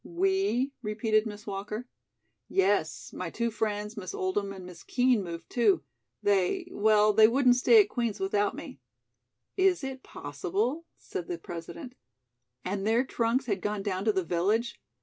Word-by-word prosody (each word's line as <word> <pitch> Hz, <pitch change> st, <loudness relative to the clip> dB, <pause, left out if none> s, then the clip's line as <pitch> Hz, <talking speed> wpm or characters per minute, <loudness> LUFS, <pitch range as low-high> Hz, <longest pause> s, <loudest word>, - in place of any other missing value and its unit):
"We?" 365 Hz, -7 st, 0 dB
repeated 215 Hz, 0 st, +1 dB
Miss 210 Hz, 0 st, -8 dB
Walker. 210 Hz, +4 st, -5 dB, 0.6 s
"Yes. 190 Hz, -4 st, 0 dB
My 180 Hz, -, -4 dB
two 235 Hz, +5 st, -2 dB
friends, 210 Hz, -1 st, -2 dB
Miss 185 Hz, -5 st, -6 dB
Oldham 195 Hz, +2 st, -1 dB
and 190 Hz, -2 st, -9 dB
Miss 180 Hz, -1 st, -11 dB
Kean, 245 Hz, -4 st, +2 dB
moved, 170 Hz, -2 st, -7 dB
too. 210 Hz, -, +3 dB, 0.4 s
They 205 Hz, -, +1 dB
well, 210 Hz, -, +4 dB
they 215 Hz, +1 st, +7 dB
wouldn't 250 Hz, +1 st, +4 dB
stay 430 Hz, -, +7 dB
at 405 Hz, -, -13 dB
Queen's 235 Hz, -4 st, -2 dB
without 205 Hz, +1 st, 0 dB
me." -, -, -9 dB, 0.8 s
"Is 375 Hz, -4 st, +3 dB
it 265 Hz, -1 st, -5 dB
possible?" 210 Hz, -, -3 dB
said 175 Hz, -, -6 dB
the 175 Hz, -, -3 dB
President. 175 Hz, -, -8 dB, 0.7 s
"And 195 Hz, +2 st, -2 dB
their 230 Hz, +3 st, +3 dB
trunks 245 Hz, +1 st, 0 dB
had 200 Hz, -6 st, -2 dB
gone 210 Hz, -1 st, -2 dB
down 190 Hz, -2 st, -2 dB
to 220 Hz, -, +4 dB
the 190 Hz, -2 st, 0 dB
village? 205 Hz, +8 st, 0 dB
210 Hz, 155 wpm, -29 LUFS, 195-245 Hz, 0.8 s, they